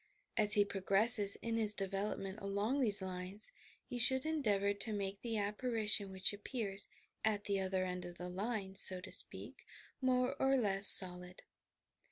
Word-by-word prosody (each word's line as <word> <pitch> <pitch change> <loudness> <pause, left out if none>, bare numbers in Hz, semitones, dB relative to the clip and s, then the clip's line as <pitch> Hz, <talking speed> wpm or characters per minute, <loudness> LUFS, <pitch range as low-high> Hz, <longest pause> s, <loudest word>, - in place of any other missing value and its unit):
As 210 -2 +5
he 205 -1 +4
prog 195 -2 -9
resses 205 0 +5
in 230 0 -3
his 215 -2 +1
development 195 0 -5
along 200 +7 -3
these 210 -6 +1
lines, 185 - -3 0.3
he 245 - -8
should 260 +3 +3
endeavour 210 -11 -1
to 215 +2 -3
make 200 -1 -6
the 230 -2 -5
apparition 210 -1 -1
which 190 +2 0
appears 205 -1 -7 0.4
"at 210 -2 -1
the 200 -1 -2
other 190 -1 -3
end 180 -1 -6
of 175 0 -11
the 180 0 -8
line," 195 +1 -5
so 185 -1 +7
to 180 - -12
speak, - - -8 0.4
more 255 +1 -1
or 270 0 +1
less 200 -4 +1
solid. 180 -1 +4
205 Hz, 165 wpm, -34 LUFS, 190-225 Hz, 0.4 s, so